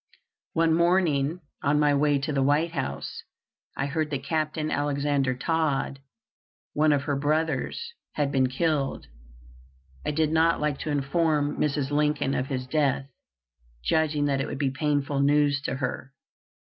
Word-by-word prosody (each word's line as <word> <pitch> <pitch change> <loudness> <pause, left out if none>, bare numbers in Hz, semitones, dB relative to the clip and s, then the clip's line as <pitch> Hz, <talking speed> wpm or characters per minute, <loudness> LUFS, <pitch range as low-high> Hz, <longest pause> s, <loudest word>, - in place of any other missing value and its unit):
One 165 -1 +3
morning, 170 -2 +2 0.2
on 145 +1 +2
my 150 -1 +4
way 145 0 +3
to 145 +2 -2
the 135 - +1
White 145 +5 +2
House, 135 -5 -4 0.6
I 135 - 0
heard 155 +2 -1
that 140 -3 -3
Captain 155 +1 -1
Alexander 140 -2 0
Todd, 145 -1 -1 0.7
one 155 +1 +3
of 145 -1 +2
her 145 0 -1
brothers, 155 - -1 0.2
had 145 -2 0
been 130 -2 +3
killed. 145 0 -1 1.0
I - - -2
did 155 +1 +1
not 165 +1 +3
like 150 -2 -1
to - - -4
inform 145 +1 +1
Mrs. 145 -2 0
Lincoln 150 -2 +1
of 130 - -1
his 130 -2 -3
death, 135 -1 0 0.7
judging 150 - +1
that 135 -2 +1
it 135 - -2
would - - -5
be 135 -1 0
painful 145 -1 0
news 145 0 +3
to 130 - -1
her. 130 0 -4
145 Hz, 150 wpm, -26 LUFS, 140-155 Hz, 1.0 s, my